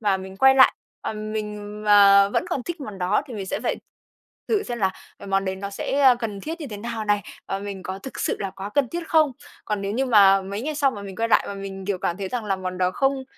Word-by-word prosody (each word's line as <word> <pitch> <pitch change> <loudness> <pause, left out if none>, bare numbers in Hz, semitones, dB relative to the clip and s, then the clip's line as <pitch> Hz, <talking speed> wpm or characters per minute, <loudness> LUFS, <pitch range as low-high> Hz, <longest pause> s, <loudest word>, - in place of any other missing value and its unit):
và 205 -3 +2
mình 190 0 -9
quay 265 +5 +6
lại, 265 -1 +7 0.3
ờm, 215 0 -5
mình 210 -1 -5
mà 200 -1 +7
vẫn - - 0
còn 255 - -1
thích 345 +1 -6
món 210 -7 -7
đó 185 +3 +1
thì 250 - -8
mình 195 -2 -5
sẽ - - -3
phải - - 0 0.7
thử 425 -2 +2
xem 240 -1 -5
là 190 -2 +1 0.3
cái 200 - -10
món 195 0 +1
đấy 190 0 -2
nó 200 +1 -5
sẽ, 270 +7 -2
ơ, 260 -3 +7
cần 210 -3 -4
thiết 325 - -6
như 295 - -5
thế 210 - -5
nào 225 +1 -4
này, 205 -1 +1 0.3
và 195 - -2
mình 195 -1 -6
có 190 +2 -5
thực 265 - -8
sự - - 0
là 195 - -2
quá 195 +2 -7
cần 285 -4 +2
thiết 340 +2 -5
không. 310 -4 +4 0.3
Còn 210 -2 -2
nếu 200 +1 -2
như 265 +3 0
mà 195 -4 +6
mấy 200 +4 -5
ngày 305 +2 -3
sau 285 -2 +2
mà 205 - -8
mình 195 -2 -8
quay 230 0 0
lại - - +4
và 200 - -4
mình, 195 -1 -7
kiểu, 200 -2 -1
cảm 175 - -1
thấy 195 -1 -4
rằng 240 +1 -3
là 195 -2 0
món 185 -1 -5
đó 180 0 +2
không 270 +5 0
205 Hz, 280 wpm, -24 LUFS, 195-250 Hz, 0.7 s, lại